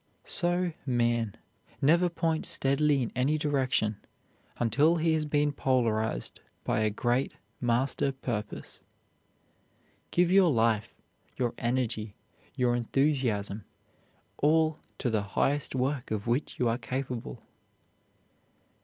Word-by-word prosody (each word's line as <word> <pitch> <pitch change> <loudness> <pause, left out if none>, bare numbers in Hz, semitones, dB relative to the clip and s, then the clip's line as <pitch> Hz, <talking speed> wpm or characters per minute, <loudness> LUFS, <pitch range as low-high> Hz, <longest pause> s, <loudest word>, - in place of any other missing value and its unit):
So 175 0 +1
man 120 -4 0 0.4
never 170 +5 +4
points 165 -1 -1
steadily 140 0 +2
in 115 - -4
any 135 +5 +2
direction 130 -8 0 0.6
until 145 +8 +3
he 165 -1 +2
has 155 -1 0
been 150 0 +1
polarized 115 - 0 0.2
by - - 0
a 110 0 +2
great 120 +5 0 0.3
master 125 +3 +1
purpose. 120 -6 -5 1.3
Give 175 0 +2
your 190 -2 +6
life, 115 -3 +1 0.4
your 120 -2 0
energy, 115 -4 -1 0.4
your 125 -2 +2
enthusiasm, 120 -5 0 0.8
all 155 +1 +3 0.2
to 125 - -1
the 110 -2 +1 0.2
highest 140 -1 +1
work 130 +1 -1
of 105 -1 -3
which 120 +5 -1
you 125 - +1
are 115 +2 0
capable. 130 -3 -4
130 Hz, 110 wpm, -29 LUFS, 115-150 Hz, 1.3 s, your